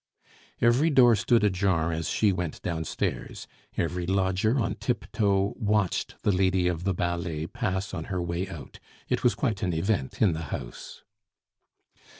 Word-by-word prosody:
Every 120 +7 +4
door 125 -5 +6
stood 115 +2 +2
ajar 90 -4 +2
as 80 0 -2
she 105 -2 +3
went 90 -3 -3
downstairs. 80 -2 -3 0.3
Every 90 +1 -1
lodger, 95 +5 +1
on - - 0
tip - - -2
toe, 100 -1 +1
watched 105 -4 0
the 105 - +3
lady 95 -1 +2
of 90 0 -2
the 95 - +2
ballet 85 -3 -2
pass 95 -2 -3
on 80 -3 -4
her 90 - -3
way 85 +2 -2
out. 85 -6 -9 0.3
It - - 0
was - - +3
quite - - -1
an 90 - 0
event 80 -4 -1
in 100 -6 +4
the 80 0 -4
house. - - -7
95 Hz, 155 wpm, -27 LUFS, 85-105 Hz, 0.3 s, door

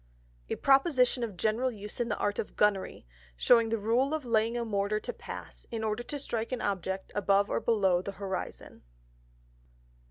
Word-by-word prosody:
_A - - -3
Proposition 270 -3 +4
of 210 -6 -4
general 225 +6 +1
Use 210 -3 -7
in 240 0 0
the - - -1
Art 205 0 -1
of - - -4
Gunnery, 200 - +1 0.3
shewing 230 - +5
the 225 - +1
Rule 240 +8 +1
of 305 -4 -5
laying 230 0 +1
a 235 - -1
Mortar 205 0 0
to - - -5
pass, - - -9
in 225 -1 -4
order 215 +1 -1
to 290 +4 -5
strike 230 -4 -3
an 255 - -1
Object 190 -1 -2
above 200 0 +2
or - - +1
below 190 -6 +2
the 195 +2 -6
Horizon. 195 -1 -6
220 Hz, 180 wpm, -30 LUFS, 200-240 Hz, 0.3 s, shewing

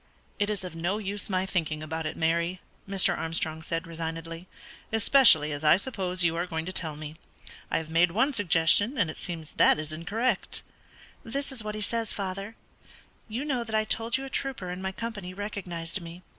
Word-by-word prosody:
"It 205 0 +2
is 210 -2 -2
of 180 -3 -7
no 175 +5 -1
use 205 -1 -3
my 185 -1 +1
thinking 155 -5 -1
about 160 0 -3
it, - - -5
Mary," 170 +2 +1 0.3
Mr. 195 -2 +5
Armstrong 160 -1 -2
said, 165 0 -2
resignedly, 165 +1 -5 0.4
"especially 225 - +6
as 145 +1 -4
I 150 +3 +7
suppose 190 -5 -1
you 165 -1 +3
are 175 +2 -1
going 160 -2 -3
to 185 - -2
tell 160 -5 -2
me. 155 +1 -8 0.5
I - - +1
have 160 -1 -4
made 170 +2 +5
one 235 +11 +2
suggestion, 205 - +4
and 180 -9 +2
it - - -12
seems 165 -4 -6
that - - +6
it - - -2
is 155 0 -3
incorrect." 205 +10 -1 0.6
"This 275 +5 -3
is 250 -5 -1
what 210 0 -4
he 215 - -4
says, 230 +1 0
father: 195 +2 -4 0.7
'You 235 +6 -3
know 260 -5 0
that 220 -1 -4
I 215 - +3
told 225 +2 +1
you 270 - -5
a - - -7
trooper 250 -11 -3
in 180 +1 -5
my 190 0 -2
company 205 -4 -6
recognised 185 -3 -3
me. 170 +2 -10
185 Hz, 200 wpm, -28 LUFS, 165-215 Hz, 0.7 s, I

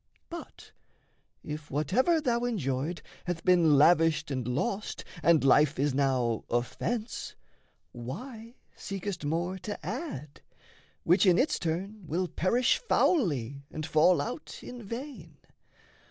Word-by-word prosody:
But 340 - -9 0.7
if 150 0 -6
whatever 200 - +2
thou 240 -5 0
enjoyed 165 - -2 0.2
hath 175 -2 -4
been 170 -5 +5
Lavished 160 0 +4
and 130 -3 -2
lost, 195 - -2 0.2
and 165 -3 +4
life 145 +2 +4
is 140 0 +1
now 130 -4 +1
offence, 215 - -2 0.6
Why 225 - -8 0.2
seekest 195 -3 -5
more 170 +5 -1
to 205 +3 -6
add 200 - -5 0.6
which 180 +4 +4
in 180 -1 +6
its 275 - +2
turn 185 +4 -3
Will 180 +5 -1
perish 235 +10 +2
foully 145 - +1
and 155 - -5
fall 160 +3 +4
out 250 +6 -6
in 245 -1 -8
vain? 225 - -8
175 Hz, 120 wpm, -29 LUFS, 145-220 Hz, 0.7 s, in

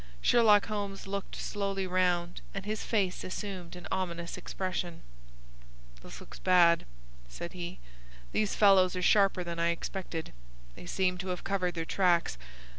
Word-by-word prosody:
Sherlock 210 - +5
Holmes 200 -2 -4
looked 200 0 -4
slowly 195 -1 -2
round, 180 -1 0
and 195 0 -4
his 215 0 -3
face 195 -5 0
assumed 185 -3 -5
an 180 - -9
ominous 170 -2 -2
expression. 180 -2 -4 1.0
"This - - -10
looks - - -12
bad," 175 - +5 0.4
said 170 - -7
he. 175 -1 -6 0.5
"These 210 -2 0
fellows 190 -3 +5
are 180 - -2
sharper 195 -2 +4
than 170 -1 -5
I 170 0 +2
expected. 170 -1 -4 0.4
They 175 - -11
seem 180 0 0
to 190 - -4
have 180 -1 -3
covered 185 -3 -1
their 165 -1 -2
tracks. 175 - +2
185 Hz, 145 wpm, -30 LUFS, 175-195 Hz, 1.0 s, Sherlock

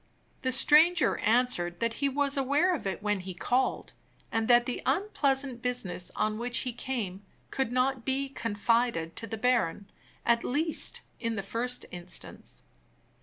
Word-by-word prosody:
The 260 - 0
stranger 315 +6 +5
answered 220 -8 +2
that 230 0 0
he 280 - +2
was 280 +1 0
aware 285 +7 +2
of 275 - -3
it 195 +1 -4
when 210 -1 0
he 185 0 -7
called, 250 +8 -1 0.4
and 225 -1 0
that 240 -1 +6
the 250 - -3
unpleasant 275 - 0
business 245 -8 -2
on 215 0 -1
which 245 +1 +1
he 250 - -3
came 220 -6 -4 0.3
could 265 -3 -1
not 255 0 0
be 270 +2 -1
confided 230 -7 0
to 225 - -4
the 225 - -5
baron 215 -5 0 0.3
at 235 0 +3
least, 310 +5 +1 0.2
in 230 -1 -2
the 195 - -3
first 240 +5 -2
instance. 175 0 -8
245 Hz, 155 wpm, -29 LUFS, 215-265 Hz, 0.4 s, that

